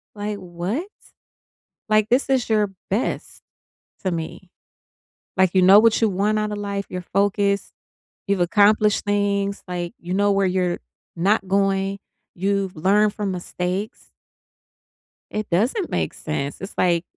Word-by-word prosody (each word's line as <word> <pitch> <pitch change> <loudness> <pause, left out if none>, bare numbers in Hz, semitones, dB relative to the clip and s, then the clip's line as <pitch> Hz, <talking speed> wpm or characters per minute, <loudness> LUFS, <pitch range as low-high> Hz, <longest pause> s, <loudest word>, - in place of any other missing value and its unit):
like, 205 0 -3
what?" 185 - -4 1.0
Like, 215 0 +3
this 260 +2 +2
is 260 -4 +2
your 210 -2 +2 0.2
best 205 +6 -2 0.6
to 185 - +1
me. 170 +2 -5 0.9
Like, 190 -2 +4
you 185 - +5
know 195 +3 +8
what 225 -1 +4
you 225 - +5
want 205 +3 +1
outta 210 0 -1
life, 200 -1 -3
you're 180 - -4
focused, 200 0 +1 0.6
you've 200 -1 +1
accomplished 210 +3 +3
things, 200 -1 0
like, 175 -1 -4
you 175 +1 -5
know 205 +1 +3
where 195 -1 +2
you're 180 -1 0 0.4
not 195 +3 +1
going, 195 0 +1 0.4
you've 195 0 -1
learned 200 +5 +3
from 205 -3 -2
mistakes. 180 +3 -4 1.2
It 215 0 -3
doesn't 240 - +1
make - - -1
sense. 145 0 -4
It's, 195 - -7
like, 175 -1 +2
200 Hz, 135 wpm, -22 LUFS, 185-210 Hz, 1.2 s, know